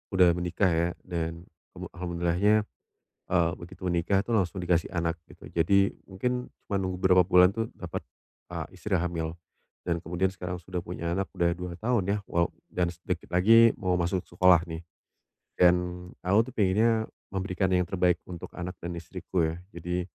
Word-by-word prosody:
udah 90 -2 +7
menikah 90 +2 +1
ya 85 +1 +2
dan 85 -2 -4 0.3
kamu 90 0 -6
alhamdulillahnya, 85 +3 +2 0.8
eee, 85 -2 +3
begitu 90 +2 -9
menikah 90 +2 +2
tuh 120 - 0
langsung 95 -2 +1
dikasih 90 -2 +1
anak 85 -2 -1 0.2
gitu. - - -14
Jadi, 100 +4 +2 0.2
mungkin 125 +6 -2 0.2
cuma 100 - -3
nunggu 95 -1 -3
beberapa 90 0 +5
bulan 90 +1 +5
tuh 115 0 -2
dapat, - - -5 0.5
eee, - - -4
istri 100 -3 -1
hamil 85 -1 -3 0.5
dan 85 -1 -1
kemudian 90 +3 0
sekarang 90 -1 -6
sudah 90 0 -5
punya 85 -1 -3
anak 95 -1 -2
udah 85 0 +1
2 90 0 -5
tahun 115 -3 +1
ya, 105 - 0
wala 85 0 +1 0.2
dan 90 -1 -1
sedikit 85 0 -5
lagi 115 +6 +7
mau 90 -3 +1
masuk 90 +1 0
sekolah 90 0 +4
nih, 80 +1 -6 0.7
dan 90 -1 +7 0.5
aku 100 +5 +3
tuh - - -24
pengennya 110 +2 +2 0.2
memberikan 95 0 -1
yang 90 -1 +1
terbaik 90 -2 +2
untuk 85 -2 -8
anak 90 0 -6
dan 85 +1 -5
istriku 85 0 -2
ya. 80 - -4 0.2
Jadi, 90 +1 -3
90 Hz, 165 wpm, -28 LUFS, 85-95 Hz, 0.8 s, udah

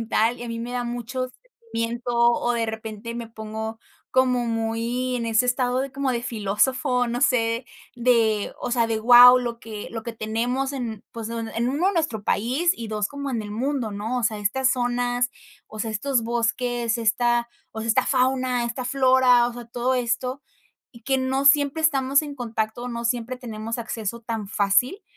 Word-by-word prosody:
sentimental 230 +1 +1
y - - -5
a 240 - -6
mí 230 0 -4
me 240 +1 -5
da 245 0 -1
mucho 245 +2 -4 0.4
sentimiento, 235 +2 -2
o 235 0 +3
de 230 -1 0
repente 220 +1 -6
me 235 -1 -6
pongo 220 0 -6 0.3
como 255 -1 +2
muy 230 +2 -1
en 235 - -3
ese 230 +2 +2
estado 250 0 +1
de 270 0 -2
como 270 -1 -1
de 235 0 -2
filósofo, 245 +3 +1
no 240 +1 -2
sé, 230 0 +2 0.3
de, 230 -4 +2
o - - -3
sea, 235 -2 +2
de 225 -1 -1
wao, 245 +2 +9
lo 235 -2 -4
que 220 -4 -8
lo 225 -1 -5
que 235 - -5
tenemos 245 +5 -2
en, 230 -5 -4
pues, 230 -1 -6
en 230 +1 -2
1 355 +8 +1
nuestro 310 - -1
país 260 - +1
y 230 -2 -6
2 210 -1 -1
como 280 -1 -5
en 235 -3 -1
el 210 - -7
mundo, 245 +1 -2
¿no? 220 +5 -3
O - - -3
sea, 220 -1 +1
estas 250 +6 +1
zonas, 245 0 0 0.4
o 215 - -11
sea, 220 +1 -2
estos 245 +3 0
bosques, 235 0 0
esta, 235 +1 +1 0.2
o 220 - -6
sea, 225 - -4
esta 255 +3 +3
fauna, 255 -2 +1
esta 245 +2 -4
flora, 255 -2 +4
o - - -7
sea, 240 -1 -8
todo 245 +2 -1
esto, 250 +2 -1 0.5
y 235 - -15
que 270 -1 +2
no 265 +1 0
siempre 285 +2 +4
estamos 275 -3 +3
en 290 -2 -7
contacto, 230 -1 -3
no 235 0 -5
siempre 245 +1 -2
tenemos 230 -1 -5
acceso 230 0 -4
tan 225 -3 -4
fácil. 220 - +1
240 Hz, 190 wpm, -24 LUFS, 225-255 Hz, 0.5 s, wao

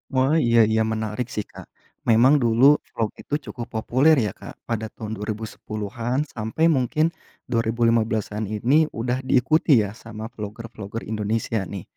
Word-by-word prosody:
Wah, 130 +4 +3
iya 115 0 +4
iya 110 0 +2
menarik 110 +2 -3
sih, 105 - -2
Kak. - - -11 0.4
Memang 120 +5 +6
dulu 115 +1 +2 0.3
vlog 110 -2 -2
itu - - -10
cukup 120 -4 -6
populer 130 +8 +4
ya, 100 - -2
Kak, - - -9 0.2
pada 110 -1 -1
tahun 110 -1 -6
2010-an 110 +3 -4 0.2
sampe 110 +7 -5 0.2
mungkin 155 +5 +1
tahun - - -29
2015-an 115 -2 +1
ini 110 +6 0 0.3
udah 125 +2 0
diikuti 155 +5 +3
ya 100 - -4
sama 110 -1 -8
vlogger-vlogger 110 0 -7
Indonesia 110 +1 -1
nih. 95 - -5
115 Hz, 145 wpm, -23 LUFS, 110-120 Hz, 0.4 s, Memang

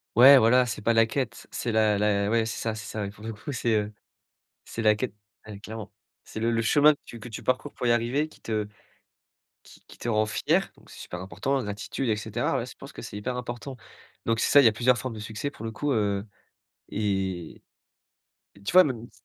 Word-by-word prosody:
Ouais 135 +3 +10
voilà, 125 +1 +5
c'est 105 -2 -5
pas 115 - +3
la 115 0 +5
quête, 120 -1 -3
c'est 120 - -3
la 110 -1 +3
la 100 0 +1
ouais 115 0 +2
c'est 110 - -4
ça, 115 -1 -2
c'est 110 0 -7
ça. 105 0 -4
Pour 105 +1 -14
le 115 - -4
coup 115 +7 -7
c'est, 120 -3 0
heu, 105 0 0 0.7
c'est 115 - -5
la 105 -1 +6
quête, 105 -1 -4 0.3
ouais 105 -2 -8
clairement. 110 0 -8 0.3
C'est - - -8
le 115 +1 +1
le 115 - +1
chemin 145 +6 +5
que - - -17
tu 115 - -10
que 115 +2 -9
tu 110 - -7
parcours 130 +3 -1
pour 120 - -2
y - - +4
arriver 120 +6 +1
qui - - -20
te 110 -2 -2 1.0
qui - - -17
qui - - -15
te 120 - -3
rend 110 0 +2
fier 110 - +1
donc - - -20
c'est - - -12
super 90 - -7
important 100 +10 -2
la 130 - 0
gratitude 105 +4 -3
et 105 - +2
cetera, 105 - -1
ouais. - - -3
Je - - -10
pense - - -11
que - - -9
c'est - - -8
hyper 125 +5 -3
important. 125 +2 -6 0.5
Donc 115 0 +1
c'est - - +1
ça, 145 - +8
il 135 - +6
y - - +10
a - - +1
plusieurs 125 +3 +3
formes 130 -3 -4
de 110 - -7
succès 110 +6 -4
pour 115 - -11
le 115 - -3
coup, 145 +5 -2
heu 100 -2 0 0.6
et 95 -5 -2 0.9
et 100 - -17
tu - - -2
vois 185 +1 +9
même 120 -7 -3
ç - - -22
115 Hz, 245 wpm, -27 LUFS, 105-125 Hz, 1.0 s, Ouais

